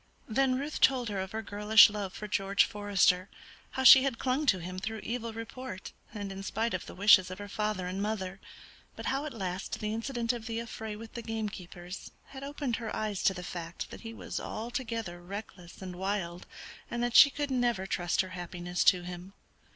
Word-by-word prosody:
Then 255 +3 +2
Ruth 285 +3 -4
told 255 -3 +4
her 200 -2 -2
of 190 0 -4
her 220 0 -4
girlish 210 +1 +7
love 205 -3 -4
for 210 - -7
George 200 -1 +3
Forester; 195 -2 +2 0.4
how 265 - -1
she 260 +1 +11
had 265 -3 0
clung 265 +5 0
to 195 - +5
him 180 +1 -6
through 220 +3 -4
evil 230 -1 -3
report, 225 -3 -7 0.2
and 205 -2 -5
in 195 0 -6
spite 225 +4 -1
of 185 - -3
the - - -9
wishes 190 -1 +6
of 185 - -6
her 205 - -7
father 210 -2 -2
and 185 +2 -3
mother, 195 -3 -3 0.6
but - - -7
how 275 +3 0
at 305 - -4
last 190 -4 -4
the 210 0 -2
incident 235 +1 -1
of 235 -1 -6
the 225 -1 -3
affray 220 -2 -6
with 225 +1 -10
the 235 - -5
gamekeepers 195 -5 -6 0.2
had 270 0 -9
opened 280 -4 -2
her 225 -2 -4
eyes 210 -3 -2
to 190 - +4
the 180 - -6
fact 170 -1 -6
that - - -9
he 225 - -7
was 230 - -5
altogether 225 -6 -4
reckless 190 -1 -9
and 180 -1 -6
wild, 185 -2 -3 0.4
and 240 0 -2
that 240 -1 -1
she 280 - +10
could 285 0 -3
never 240 -6 +1
trust 175 -2 +1
her 185 - -6
happiness 175 0 -3
to 180 -2 +5
him. 180 +2 -8
210 Hz, 205 wpm, -30 LUFS, 185-235 Hz, 0.6 s, she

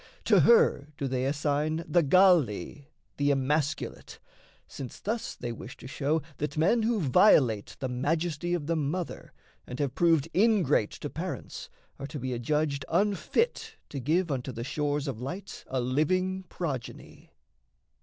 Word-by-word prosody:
To - - +5
her 465 - +5
do 140 - -2
they 130 0 -1
assign 150 +3 -1
The 170 +3 +3
Galli, 150 - +3 0.3
the 145 0 +2
emasculate, 140 +2 -1 0.5
since 130 -3 -8
thus 225 +3 -3
They 120 - -5
wish 115 - -9
to - - -13
show 145 +4 -1
that 150 +1 -4
men 190 +9 +3
who 225 0 +1
violate 130 - +4
The 130 - -2
majesty 160 +6 -1
of 160 -4 -4
the 165 +2 0
mother 160 +4 -3 0.4
and 125 - -6
have 140 -2 -1
proved 165 -3 +3
Ingrate 190 - +3
to - - -4
parents - - -6 0.3
are 140 - -5
to 150 - -7
be 130 0 -3
adjudged 140 +3 -1
Unfit 210 - 0
to 140 - -5
give 160 +6 +1
unto 130 -1 -3
the 115 -1 -6
shores 145 +2 -1
of 125 -4 -4
light 180 +10 -6
A 130 - -2
living 185 +9 0
progeny. 140 -9 -6
150 Hz, 150 wpm, -28 LUFS, 135-175 Hz, 0.5 s, To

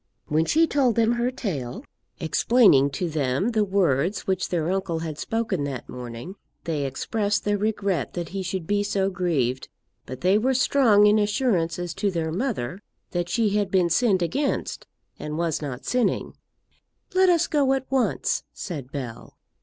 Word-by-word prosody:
When 155 +2 +1
she 325 - +4
told 270 -7 +2
them 230 0 +3
her 240 +1 +1
tale, 145 - -5 0.3
explaining 160 - +4
to 175 +6 -3
them 150 - 0
the 220 -3 +2
words 185 -3 +1
which 190 -1 -1
their 170 -1 0
uncle 190 -3 -1
had 160 -2 -5
spoken 225 -9 -1
that 135 -3 -5
morning, 125 - -8 0.3
they 150 -4 -2
expressed 205 +10 -1
their 205 -1 +1
regret 200 - -1
that 170 -3 -4
he 195 0 -4
should 185 -1 -3
be 205 +3 +1
so 195 -1 0
grieved; 145 -9 -1 0.4
but 130 +1 -7
they 190 +4 +4
were 260 +4 +1
strong 245 -6 +4
in 210 +1 +5
assurances 180 - 0
to 200 - 0
their 165 -3 -2
mother 190 - -3 0.3
that 175 -1 -2
she 220 0 +1
had 205 -1 +1
been 180 -3 +2
sinned 195 -2 +3
against, 275 - -2 0.3
and 150 0 -5
was 165 -3 -1
not 135 -4 -6
sinning. 250 -1 0 0.8
"Let 375 0 +5
us 340 -1 +4
go 285 -4 +2
at 265 -1 -1
once," 265 -2 +1
said 145 -9 -6
Bell. 130 -6 -7
190 Hz, 165 wpm, -24 LUFS, 155-220 Hz, 0.8 s, in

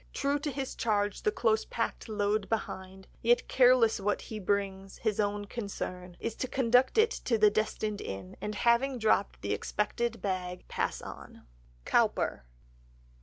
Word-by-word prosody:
True 280 +1 +1
to 295 - -2
his 270 -1 -4
charge 205 -3 0
the 210 - +2
close 220 0 +2
packed 230 0 -3
load 210 -1 0
behind, 190 -3 -4
Yet 240 +1 +3
careless 250 -4 +5
what 205 +1 0
he 220 - -6
brings, 195 -1 -2
his 215 -2 -1
own 205 0 0
concern 185 -5 -6
Is 230 - -3
to 255 - -2
conduct 250 - +3
it 440 +1 +5
to 230 - +2
the 210 -1 +6
destined 215 0 -1
inn, 95 -1 -6
And 210 0 -3
having 240 +4 +3
dropped 215 -3 +1
the - - 0
expected 230 +2 -1
bag—pass 185 -2 -3
on." - - -10 0.4
(COWPER.) - - +1
215 Hz, 150 wpm, -30 LUFS, 200-235 Hz, 0.4 s, the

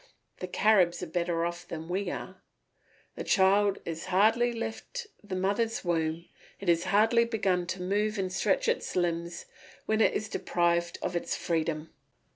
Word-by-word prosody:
The 185 - -4
Caribs 180 -3 +3
are - - -1
better 170 0 -1
off 175 0 -5
than 160 -1 -6
we 185 +2 -1
are. - - -7 0.7
The - - -5
child 200 0 +3
has 165 -1 -5
hardly 220 +6 +3
left 230 - -5 0.2
the 200 -2 -5
mother's 200 +4 0
womb, 165 -1 0 0.3
it 195 - -2
has 170 +1 +3
hardly 225 +4 +4
begun 195 -6 0
to 185 0 -4
move 210 +3 0
and 185 -2 -2
stretch 195 +1 +1
its - - -1
limbs, 170 -1 -1 0.4
when 220 0 +1
it - - +4
is 215 - -1
deprived 170 -3 0
of 175 - -2
its 175 - -1
freedom. 160 -1 -2
185 Hz, 160 wpm, -29 LUFS, 170-210 Hz, 0.7 s, hardly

